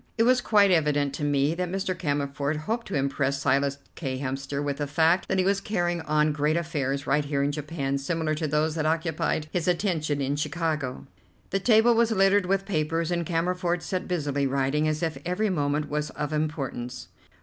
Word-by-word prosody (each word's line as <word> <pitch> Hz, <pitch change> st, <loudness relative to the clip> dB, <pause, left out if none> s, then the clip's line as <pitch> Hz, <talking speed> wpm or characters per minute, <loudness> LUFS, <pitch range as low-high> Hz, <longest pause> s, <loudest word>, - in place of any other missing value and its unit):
It 225 Hz, -, +4 dB
was 250 Hz, +1 st, +4 dB
quite 205 Hz, -4 st, +4 dB
evident 145 Hz, -4 st, +2 dB
to 145 Hz, -, -5 dB
me 145 Hz, +1 st, +2 dB
that 180 Hz, +1 st, -2 dB
Mr. 190 Hz, 0 st, -2 dB
Cammerford 145 Hz, -2 st, -1 dB
hoped 225 Hz, +8 st, -3 dB
to 195 Hz, -, -4 dB
impress 140 Hz, 0 st, 0 dB
Silas 140 Hz, 0 st, +1 dB, 0.2 s
K. 135 Hz, -5 st, -4 dB
Hemster 140 Hz, +1 st, -3 dB
with 140 Hz, -1 st, -2 dB
the 145 Hz, -, -2 dB
fact 160 Hz, +5 st, +2 dB
that 190 Hz, -, 0 dB
he 185 Hz, -, +2 dB
was 195 Hz, 0 st, +2 dB
carrying 175 Hz, -5 st, -1 dB
on 155 Hz, -1 st, +2 dB
great 150 Hz, +2 st, +1 dB
affairs 140 Hz, -4 st, -2 dB
right 150 Hz, +2 st, +2 dB
here 140 Hz, -1 st, -1 dB
in 140 Hz, -, +1 dB
Japan 145 Hz, -2 st, -3 dB
similar 160 Hz, +2 st, -1 dB
to 155 Hz, 0 st, -2 dB
those 150 Hz, +2 st, +1 dB
that 155 Hz, -1 st, -1 dB
occupied 160 Hz, -1 st, 0 dB
his 175 Hz, -2 st, -1 dB
attention 170 Hz, -5 st, 0 dB
in 140 Hz, +1 st, -1 dB
Chicago. 150 Hz, -3 st, -2 dB, 0.5 s
The 195 Hz, -, +1 dB
table 225 Hz, +3 st, +5 dB
was 230 Hz, 0 st, +3 dB
littered 195 Hz, -2 st, +3 dB
with 195 Hz, +1 st, +1 dB
papers, 165 Hz, -2 st, -1 dB
and 170 Hz, -2 st, -1 dB
Cammerford 175 Hz, +1 st, 0 dB
sat 185 Hz, -1 st, -3 dB
busily 145 Hz, -5 st, 0 dB
writing 135 Hz, +3 st, +1 dB
as 155 Hz, +1 st, -1 dB
if 160 Hz, -1 st, -2 dB
every 185 Hz, +4 st, 0 dB
moment 145 Hz, -2 st, 0 dB
was 150 Hz, 0 st, -2 dB
of 150 Hz, 0 st, -4 dB
importance. 135 Hz, -5 st, -3 dB
155 Hz, 195 wpm, -26 LUFS, 145-180 Hz, 0.5 s, table